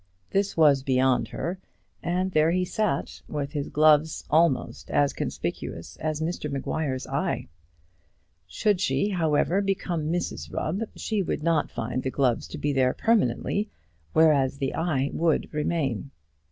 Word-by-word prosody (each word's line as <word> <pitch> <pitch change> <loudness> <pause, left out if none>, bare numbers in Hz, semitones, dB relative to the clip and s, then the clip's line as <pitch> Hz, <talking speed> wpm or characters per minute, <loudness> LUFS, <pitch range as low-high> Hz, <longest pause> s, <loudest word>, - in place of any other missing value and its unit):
This 195 -1 0
was 145 -4 +5
beyond 130 -1 +2
her, 180 +3 -4 0.4
and 180 +2 -1
there 155 -1 +4
he 180 +2 +1
sat, 205 -6 -2
with 145 -2 -3
his 145 -2 -3
gloves 155 0 +4
almost 155 -6 +2
as 145 -1 +2
conspicuous 80 - -4
as 155 0 -2
Mr 160 -2 -3
Maguire's 135 -1 -2
eye. - - -2 1.0
Should 205 - +1
she, 135 +8 +1
however, 170 -1 +1
ever - - +3
become 180 -5 -1
Mrs 175 +1 -3
Rubb, 180 +7 -2
she 215 -3 -1
would 165 - -2
not 165 -2 +2
find 120 +2 -3
the 130 - -2
gloves 130 -3 +1
to - - -7
be 145 0 -1
there 130 -1 +2
permanently; 205 - +1 0.4
whereas 145 -4 +4
the 135 -2 -2
eye 145 -5 0
would 165 -1 +1
remain. 145 -5 -1
155 Hz, 145 wpm, -26 LUFS, 135-175 Hz, 1.0 s, was